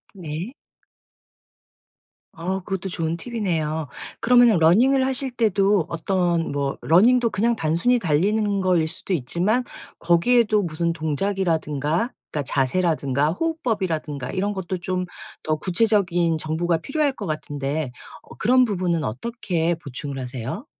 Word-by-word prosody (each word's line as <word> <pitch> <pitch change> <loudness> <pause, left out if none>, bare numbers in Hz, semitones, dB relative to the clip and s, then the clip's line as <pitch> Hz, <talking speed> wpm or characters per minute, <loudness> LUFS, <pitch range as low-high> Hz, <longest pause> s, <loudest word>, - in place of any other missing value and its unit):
네. 175 - -6 1.8
어 185 +3 -2
그것도 190 +1 -4
좋은 165 -2 -2
팁이네요. 165 - -2 0.3
그러면은 245 -2 +5
running을 250 +12 +4
하실 265 0 +1
때도 205 -6 +2
어떤 170 0 0
뭐 140 -1 -2
running도 230 +8 +4
그냥 225 +3 +1
단순히 175 +8 +1
달리는 200 +4 +1
거일 180 -4 +2
수도 170 +4 -3
있지만 180 - 0 0.4
거기에도 210 +4 +3
무슨 170 0 -1
동작이라든가 160 - -1 0.2
그러니까 150 - -1
자세라든가 140 0 +1
호흡법이라든가 190 - -2
이런 200 +2 -1
것도 185 -1 -4
좀 180 +1 -2 0.4
더 155 - 0
구체적인 175 -3 +2
정보가 165 +2 0
필요할 285 - 0
것 215 -7 -7
같은데 145 -2 -3 0.3
어 - - -14
그런 250 +3 +4
부분은 180 -6 -1
어떻게 170 - -2
보충을 140 -3 -7
하세요? 130 - -5
175 Hz, 335 characters per minute, -23 LUFS, 155-215 Hz, 1.8 s, 그러면은